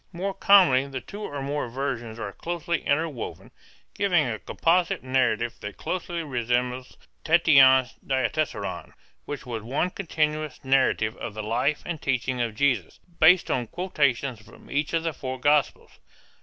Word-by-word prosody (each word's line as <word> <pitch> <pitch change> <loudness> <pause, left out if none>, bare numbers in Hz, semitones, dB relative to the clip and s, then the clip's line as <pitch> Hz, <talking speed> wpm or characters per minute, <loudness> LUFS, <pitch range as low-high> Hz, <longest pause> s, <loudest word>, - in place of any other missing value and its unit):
More 190 +2 -3
commonly 190 -10 +5
the 135 -1 -5
two 205 +10 -10
or 145 -9 -5
more 140 -2 -2
versions 120 -3 -4
are 100 -3 -5
closely 170 -1 -3
interwoven, 145 -4 -2 0.4
giving 180 -6 +2
a 115 -4 -3
composite 170 -2 +1
narrative 125 -3 0
that 105 0 -7
closely 175 -2 -3
resembles 125 -1 -2 0.3
Tatian's 135 -6 +5
Diatessaron 140 +3 -2 0.3
which 145 -3 -6
was 115 -3 -4
one 140 - -1
continuous 155 -6 -2
narrative 130 -4 +2
of 105 - -6
the 110 - -4
life 120 +7 0
and 165 -4 -5
teachings 125 -1 -1
of 115 -2 -2
Jesus, 125 - 0 0.2
based 175 +3 +5
on 120 -2 -1
quotations 140 - -1
from 105 - -17
each 145 +2 -1
of 165 -1 +1
the 165 -1 -1
four 130 -2 -5
Gospels. 145 0 +1
140 Hz, 145 wpm, -25 LUFS, 125-165 Hz, 0.4 s, commonly